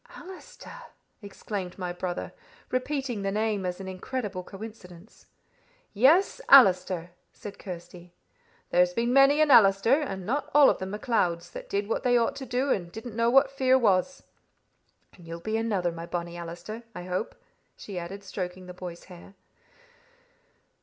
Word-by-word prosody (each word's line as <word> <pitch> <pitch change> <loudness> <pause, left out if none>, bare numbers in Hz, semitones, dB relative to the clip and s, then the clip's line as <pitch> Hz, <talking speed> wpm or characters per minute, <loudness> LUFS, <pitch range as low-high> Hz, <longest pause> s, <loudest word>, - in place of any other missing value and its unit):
"Allister!" 380 +6 -11 0.4
exclaimed 200 -2 -6
my 180 -2 -4
brother, 175 0 -5 0.4
repeating 255 -3 -2
the 195 0 -1
name 210 -2 -1
as 180 +1 -4
an 190 - -7
incredible 190 0 -5
coincidence. 195 -2 -12 0.7
"Yes, 305 - +4
Allister," 185 -8 +6 0.2
said 205 -1 -10
Kirsty. 175 -1 -9 0.6
"There's 180 0 +3
been 235 +4 0
many 275 +3 +6
an 305 -2 +4
Allister, 225 +5 +5
and 195 -10 -5
not 285 +7 -2
all 290 -2 +8
of - - -5
them 190 - -5
MacLeods, 180 -6 -1
that - - -9
did 200 0 -1
what 225 - -1
they 245 -1 +3
ought 230 - +1
to 265 - -7
do, 260 +2 0
and 175 -3 -1
didn't 220 +2 -8
know 230 0 +2
what 270 +2 +4
fear 260 -1 +3
was. 225 +3 +1 0.9
And 175 -2 -16
you'll 165 0 -6
be 220 +6 -3
another, 205 -6 0
my 165 0 -8
bonnie 170 0 -4
Allister, 175 +6 -7
I 180 - -6
hope," 185 +4 -3 0.4
she 195 -4 -7
added, 190 +4 -8
stroking 185 -1 -6
the 180 - -9
boy's 175 -1 -8
hair. 180 +1 -14
200 Hz, 155 wpm, -27 LUFS, 180-245 Hz, 0.9 s, all